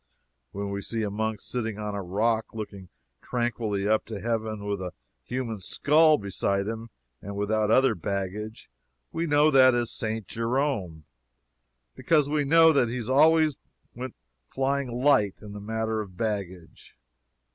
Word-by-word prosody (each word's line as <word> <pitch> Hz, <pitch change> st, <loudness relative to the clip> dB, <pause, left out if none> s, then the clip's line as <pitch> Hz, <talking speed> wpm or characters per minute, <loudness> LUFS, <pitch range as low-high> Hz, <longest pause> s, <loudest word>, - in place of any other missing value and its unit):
When 100 Hz, 0 st, -4 dB
we 100 Hz, 0 st, -3 dB
see 115 Hz, +2 st, -3 dB
a 105 Hz, -, -2 dB
monk 110 Hz, 0 st, -2 dB
sitting 115 Hz, -4 st, -3 dB
on 105 Hz, -1 st, -4 dB
a 100 Hz, -, -3 dB
rock, 110 Hz, +5 st, -1 dB
looking 100 Hz, -4 st, -7 dB, 0.3 s
tranquilly 110 Hz, -5 st, -2 dB
up 110 Hz, 0 st, +2 dB
to 110 Hz, -3 st, -5 dB
heaven, 110 Hz, -2 st, -2 dB
with 100 Hz, -2 st, -2 dB
a 90 Hz, -2 st, -5 dB, 0.3 s
human 120 Hz, -4 st, -4 dB
skull 155 Hz, -, +4 dB
beside 100 Hz, -1 st, -1 dB
him, 115 Hz, +1 st, -5 dB, 0.3 s
and 100 Hz, +1 st, -7 dB
without 105 Hz, +1 st, 0 dB
other 130 Hz, +4 st, +5 dB
baggage, 100 Hz, +4 st, -4 dB, 0.4 s
we 170 Hz, +1 st, -2 dB
know 150 Hz, +1 st, +4 dB
that 130 Hz, -2 st, +7 dB
that -, -, +2 dB
is 120 Hz, -1 st, -1 dB
St. 110 Hz, -1 st, -3 dB
Jerome. 115 Hz, -, -2 dB, 0.9 s
Because 150 Hz, -, +2 dB
we 145 Hz, 0 st, 0 dB
know 165 Hz, +2 st, +6 dB
that 125 Hz, -5 st, +3 dB
he 120 Hz, -2 st, -4 dB
always 155 Hz, +2 st, +4 dB, 0.4 s
went 125 Hz, +1 st, -7 dB, 0.3 s
flying 135 Hz, +1 st, -1 dB
light 120 Hz, -5 st, +2 dB
in 105 Hz, -1 st, -10 dB
the 105 Hz, -, -7 dB
matter 110 Hz, +1 st, -2 dB
of 95 Hz, -4 st, -10 dB
baggage. 95 Hz, -6 st, -5 dB
110 Hz, 155 wpm, -27 LUFS, 100-130 Hz, 0.9 s, that